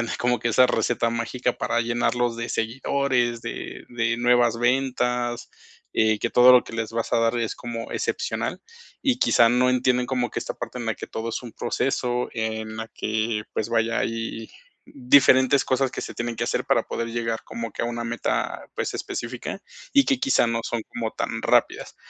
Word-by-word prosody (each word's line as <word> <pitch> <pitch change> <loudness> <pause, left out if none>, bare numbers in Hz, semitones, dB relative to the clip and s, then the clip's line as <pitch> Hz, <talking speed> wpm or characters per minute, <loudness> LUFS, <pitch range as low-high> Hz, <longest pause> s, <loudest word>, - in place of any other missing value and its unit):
tener 120 - -2
como 125 0 +1
que 120 - 0
esa 125 +3 +5
receta 120 -1 +1
mágica 120 +2 -1
para 120 - 0
llenarlos 120 0 0
de 115 0 -4
seguidores, 120 0 0
de - - -6
de 115 -1 0
nuevas 120 -1 +3
ventas, 125 -1 0 0.4
eh, 110 -1 +2
que 115 - -2
todo 125 +1 +7
lo 125 - +6
que - - -11
les 115 -1 -3
vas 115 0 -3
a 120 - +4
dar 115 +1 +2
es 115 -2 -2
como 115 -1 -6
excepcional, - - -2 0.4
y 260 -3 +2
quizá 115 - +5
no 125 +2 +3
entienden 125 0 +2
como 125 -2 -1
que - - -3
esta 120 - -5
parte 120 +1 -6
en 120 - -5
la 110 - 0
que - - -8
todo 110 +1 -5
es 115 - -4
un 120 - -9
proceso, 125 -2 -1
en 110 -1 -3
la 110 0 -5
que, 110 0 -2
pues 110 - -2
vaya, 115 0 +1
hay 115 0 -3 0.4
diferentes 130 0 +5
cosas 130 0 +1
que - - -5
se - - -6
tienen 120 -1 -3
que - - -1
hacer - - -1
para - - +2
poder 115 - -3
llegar 115 -1 -2
como 115 -2 -6
que - - -4
a - - 0
una 120 0 -3
meta, 120 +1 -2
pues - - -3
específica, - - -5 0.3
y 280 -1 +6
que 270 -3 +1
quizá 265 - +3
no 115 0 0
son 120 0 -2
como 115 -2 -3
tan - - -3
rápidas. - - +1
120 Hz, 195 wpm, -24 LUFS, 115-125 Hz, 0.4 s, todo